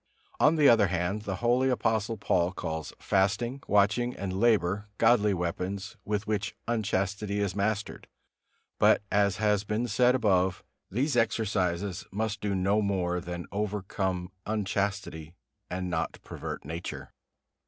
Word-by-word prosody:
On 155 +2 +5
the 150 -3 +5
other 110 -4 +6
hand, 90 +3 -1
the 95 - -2
holy 125 +2 +3
Apostle 115 -2 0
Paul 90 -2 +1
calls 80 -4 -4
fasting, 110 +7 0
watching 105 +4 +2
and 95 -1 -3
labor 105 -3 +2
godly 115 -2 +4
weapons, 95 +2 -3
with 105 0 -2
which 105 -1 -2
unchastity 100 -2 -1
is 100 -2 -1
mastered; 105 +1 -2 0.7
but, - - +5
as 100 -2 +2
has 105 -2 +2
been 105 +3 -1
said 125 +3 +3
above, 95 -6 +2 0.3
these 135 +8 0
exercises 100 -5 0
must 105 +1 -2
do 100 -2 -1
no 100 +3 +2
more 90 -3 0
than 85 -1 -6
overcome 95 -3 -2 0.2
unchastity, 100 -5 -2 0.3
and 90 +1 -3
not 85 -2 -2
pervert - - -6
nature. 80 +3 -6
100 Hz, 130 wpm, -28 LUFS, 95-110 Hz, 0.7 s, other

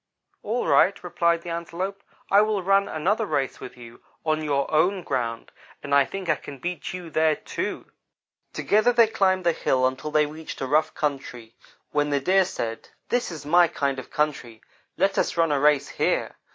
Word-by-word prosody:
"'All 230 +4 -2
right,' 200 0 +3
replied 170 -1 +1
the 175 - -6
Antelope, 175 +4 -4 0.3
'I 200 +1 +7
will 215 -3 0
run 195 +1 +3
another 205 +8 0
race 135 -6 -1
with 125 - -10
you 120 -1 -13 0.2
on 155 0 0
your 140 -2 0
own 180 +4 +2
ground, 120 -5 -3 0.3
and 140 - -3
I 140 -1 +6
think 195 +3 -6
I - - +2
can 140 - -10
beat 175 +5 -5
you 180 -3 -8
there, 155 0 +3
too.' - - -5 0.7
"Together 215 +4 +2
they 235 -1 +5
climbed 190 -4 +1
the 170 - +5
hill 130 -5 +1
until 130 +4 -2
they 150 0 +3
reached 155 +2 -8
a - - -2
rough 155 +4 +1
country, 130 -6 -4 0.4
when 145 0 +1
the 140 -1 +1
Deer 190 +7 +3
said: 115 -8 -5 0.2
"'This 245 0 0
is 155 -5 -8
my 175 +3 +5
kind 140 -4 -2
of 130 - -10
country. 140 -7 -2 0.3
Let 195 0 +2
us - - -1
run 165 -2 +3
a 145 - +2
race 150 -1 +3
here. - - -1
155 Hz, 190 wpm, -24 LUFS, 140-185 Hz, 0.7 s, I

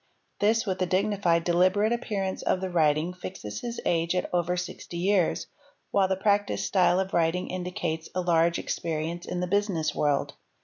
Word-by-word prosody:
This, 220 +2 +2
with 190 -3 -2
the 185 - +1
dignified, 185 -3 +1
deliberate 185 +6 +3
appearance 200 -5 -2
of - - +1
the 190 0 -4
writing 155 0 +2
fixes 175 - -7
his 235 -1 -4
age 170 +1 +1
at 180 - 0
over 180 0 +1
sixty 175 -1 -6
years, 185 0 +1 0.5
while 195 -1 +3
the 190 - +1
practised 205 +1 +1
style 185 -1 +3
of 190 0 -2
writing 170 +2 +1
indicates 180 -3 -3
a 185 - +1
large 170 -1 +3
experience 165 +1 -3
in 180 - -3
the - - +1
business 185 -5 0
world. 145 -2 0
180 Hz, 170 wpm, -27 LUFS, 170-195 Hz, 0.5 s, deliberate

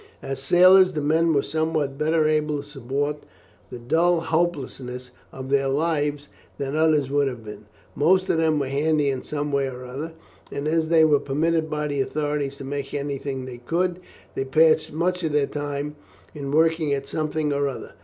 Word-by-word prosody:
As 135 0 -4
sailors, 185 +4 +6
the 150 - -2
men 165 +3 +3
were 140 -3 +2
somewhat 155 -3 -1
better 155 0 +2
able 150 -1 +1
to - - -17
support 145 +1 -3 0.5
the - - -7
dull 165 +8 +2
hopelessness 135 -7 -2 0.2
of 130 0 -8
their 135 -1 +3
lives 145 0 -1 0.3
than 140 +1 -3
others 155 -4 +2
would 145 0 +2
have 120 -4 -6
been. 105 0 -10 0.3
Most 185 +5 +3
of - - +1
them 160 -1 +2
were 140 - 0
handy 145 +1 +1
in 130 - -3
some 145 -1 -4
way 140 -1 +1
or 125 0 -8
other, 145 +6 -6 0.4
and 140 +1 -3
as 160 0 +1
they 160 -1 +6
were 150 -2 +4
permitted 160 +3 0
by 150 0 -2
the 145 -2 -1
authorities 145 -1 -2
to - - -8
make 140 +1 -5
anything 140 -2 -3
they 125 -2 -8
could, 175 +8 -1 0.3
they - - -2
passed 155 +3 +3
much 180 +4 -1
of 155 -2 -1
their 145 -1 +3
time 145 +1 -4 0.4
in 140 -3 -6
working 160 0 +2
at 140 0 -6
something 155 -1 -1
or 140 0 +1
other. 135 - -7
150 Hz, 185 wpm, -24 LUFS, 140-160 Hz, 0.5 s, sailors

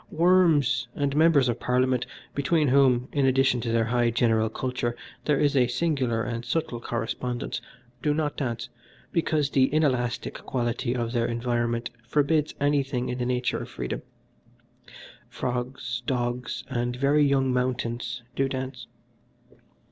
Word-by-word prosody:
Worms 165 -7 +3
and 140 -1 0
Members 155 -4 +5
of 120 -1 -1
Parliament, 125 0 +1 0.3
between 150 +1 +2
whom, 130 -2 +4
in 140 -2 +2
addition 130 -2 +3
to 115 - -2
their 115 -1 +2
high 120 0 +2
general 115 -1 +2
culture, 125 0 -2 0.3
there 150 -2 +2
is 145 -1 +2
a 125 -2 +4
singular 125 -5 0
and 120 -1 -3
subtle 125 -4 -2
correspondence, 120 +1 -3 0.4
do 150 - +1
not 150 -1 -1
dance, 115 -4 -3 0.4
because 155 -4 +1
the 130 -1 +4
inelastic 130 -6 0
quality 120 0 -2
of 120 -2 -2
their 120 -1 +1
environment 120 0 -1 0.2
forbids 150 +3 +1
anything 140 -3 +1
in 125 - -3
the 120 - -1
nature 125 0 0
of - - -7
freedom. - - -4 1.3
Frogs, 125 -1 -3
dogs, 120 -1 -2
and 120 -2 -2
very 140 +3 +3
young 135 -2 +2
mountains 125 -1 -2
do 135 0 +1
dance. 130 -3 -5
125 Hz, 140 wpm, -26 LUFS, 120-140 Hz, 1.3 s, Members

